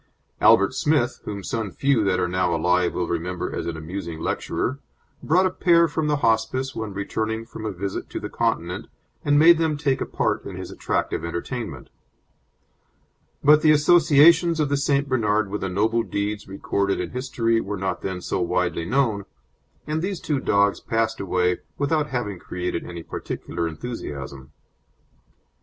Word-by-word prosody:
Albert - - +5
Smith, - - +1
whom 100 -2 -5
some 110 +1 -2
few 135 +2 +1
that 95 -2 +1
are 90 - +1
now 90 -1 0
alive 90 +2 +1
will 90 - -1
remember 85 +1 -3
as - - -3
an 85 -1 -3
amusing 85 0 -6
lecturer, 130 +10 -2 0.4
brought 180 +5 +3
a 185 - +1
pair 170 -2 +4
from 160 0 -2
the 150 - +2
Hospice 115 +4 +1
when 110 -2 -4
returning 110 +3 -3
from 110 -1 -7
a - - -2
visit 95 +1 -5
to - - -4
the - - -5
Continent - - -2 0.4
and 145 0 +3
made 165 +2 +7
them 160 -2 +1
take 140 -3 0
a - - -2
part - - -1
in - - -7
his - - -7
attractive - - -2
entertainment; 85 - -5 1.5
but 150 +1 +6
the 155 - +4
associations 160 +2 +5
of 150 -2 +1
the 145 - +2
St. 140 0 +1
Bernard 110 -5 +1
with 105 - -3
the 95 - -2
noble 110 +5 +1
deeds 105 -1 -3
recorded 100 0 -1
in 90 -1 -3
history 115 -3 0
were 100 +1 -4
not 95 0 -2
then 95 -1 -4
so - - -2
widely 90 -1 0
known, 110 -3 +1 0.6
and 155 +1 -2
these 190 0 -2
two 150 -4 -1
dogs 100 -4 +2
passed 115 0 -1
away 90 -2 0 0.2
without 150 +1 +1
having 110 -9 -3
created 90 -1 -4
any 85 -1 -7
particular 85 - -4
enthusiasm. 75 - -7
110 Hz, 165 wpm, -23 LUFS, 90-140 Hz, 1.5 s, made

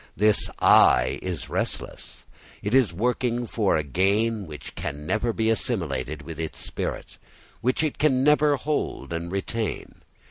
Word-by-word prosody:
This 105 +1 +3
"I" - - +5
is 90 -3 -4
restless. - - -4 0.4
It 105 - -2
is 130 -7 +4
working 120 +5 0
for 105 -6 +1
a 80 - 0
gain 100 - +1
which 75 -3 -9
can 75 +1 -5
never 110 +7 0
be 110 0 -1
assimilated 80 - -2
with 80 +1 -8
its 80 -1 -4
spirit, - - -5 0.4
which 130 +6 +1
it 155 - -2
never 145 +2 +3
can - - -17
hold 150 - -2
and 85 +1 -4
retain. 105 +3 -4
105 Hz, 145 wpm, -25 LUFS, 85-120 Hz, 0.4 s, I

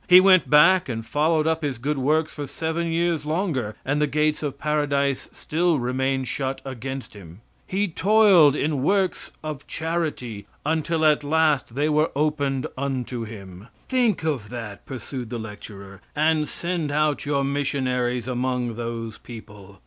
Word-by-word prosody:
He 180 0 +10
went 185 -1 +5
back 170 +3 +6
and 115 -2 -4
followed 155 +5 +1
up 160 0 +1
his 140 -5 -2
good 140 +4 -2
works 155 +4 +1
for 145 -2 -5
seven 160 +4 -2
years 170 -2 0
longer, 150 - -1
and 145 +2 0
the 150 - +3
gates 150 +1 +1
of 140 -2 -3
Paradise 140 -2 0
still 170 +1 0
remaining 130 +1 0
shut 130 +2 -3
against 135 0 -6
him, 95 -1 -13 0.3
he 200 +2 0
toiled 190 -5 +5
in 145 -2 0
works 190 +5 0
of 150 -3 -6
charity 155 -10 -3 0.2
until 160 +1 0
at 150 -1 +4
last 150 -5 +1
they 145 +2 +1
were 155 +1 +2
opened 145 -3 0
unto 130 -3 -3
him. 100 -2 -10 0.2
Think 245 -8 +2
of 135 -10 -2
that, 115 -4 -7
pursued 130 -2 -6
the 120 - -4
lecturer, 100 -3 -9
and 155 0 +2
send 170 -4 -2
out 150 -2 0
your 140 -1 +1
missionaries 130 -3 -1
among 125 -2 -1
those 115 -2 -5
people. 105 -4 -12
145 Hz, 155 wpm, -24 LUFS, 125-160 Hz, 0.3 s, He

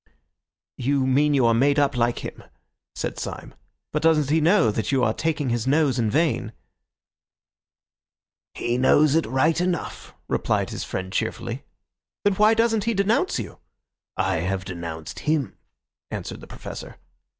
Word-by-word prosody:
"You 135 +1 +1
mean 145 +3 +3
you 130 -3 +3
are 115 - +4
made 140 +5 +3
up 145 -2 +2
like 120 0 0
him," - - -8 0.5
said - - -4
Syme. - - -6 0.4
"But 150 - 0
doesn't 155 -3 +3
he 160 +1 +3
know 170 - +4
that 110 +5 -2
you 135 -2 +2
are 110 - +2
taking 155 -3 -1
his 120 0 -1
nose 140 -3 +2
in 110 -2 +1
vain?" 145 -5 0 2.0
"He 120 +1 -1
knows 145 +3 +4
it 165 -4 +2
right 155 +8 +2
enough," 180 -1 -3
replied - - 0
his - - -4
friend 95 0 -5
cheerfully. - - -3 0.6
"Then 205 - +3
why 210 +3 +4
doesn't 225 -2 +2
he 230 -1 0
denounce 200 +3 +1
you?" - - -6 0.6
"I - - +1
have 95 +3 -2
denounced 85 -4 -6
him," 150 -8 -1 0.5
answered - - -6
the - - -11
Professor. - - -9
140 Hz, 150 wpm, -24 LUFS, 120-160 Hz, 2.0 s, are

